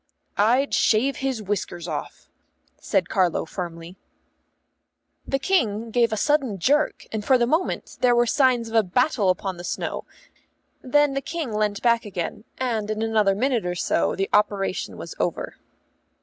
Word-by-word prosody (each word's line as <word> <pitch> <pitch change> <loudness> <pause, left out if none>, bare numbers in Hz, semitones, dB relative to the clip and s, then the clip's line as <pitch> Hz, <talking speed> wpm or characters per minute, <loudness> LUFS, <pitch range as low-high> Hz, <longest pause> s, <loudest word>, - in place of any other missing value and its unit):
"I'd 245 +7 +3
shave 250 +6 +2
his 260 -5 -2
whiskers 180 -4 -3
off," 155 -3 -6 0.5
said 190 -5 0
Carlo 180 -4 +1
firmly. 170 0 -7 1.3
The 270 - +1
King 230 - 0
gave 235 -1 +2
a 220 - -1
sudden 270 -4 +1
jerk, 290 - +1
and 220 -1 -3
for 260 +4 +4
the 240 - +2
moment 320 +9 -1
there 245 -1 +4
were 240 0 +4
signs 245 -1 +2
of 225 - -9
a 225 - +5
battle 215 - +1
upon 185 0 -1
the 175 - -8
snow; - - -4 0.8
then 290 +2 +3
the 275 - -1
King 310 -5 -4
leant 210 -1 -1
back 235 -1 +3
again, 200 +1 -5
and 225 -5 -2
in 215 +1 -1
another 215 -3 +2
minute 250 +1 +1
or 180 0 -2
so 170 - 0
the 195 0 -1
operation 200 -2 0
was - - -7
over. - - -2
220 Hz, 160 wpm, -24 LUFS, 195-260 Hz, 1.3 s, a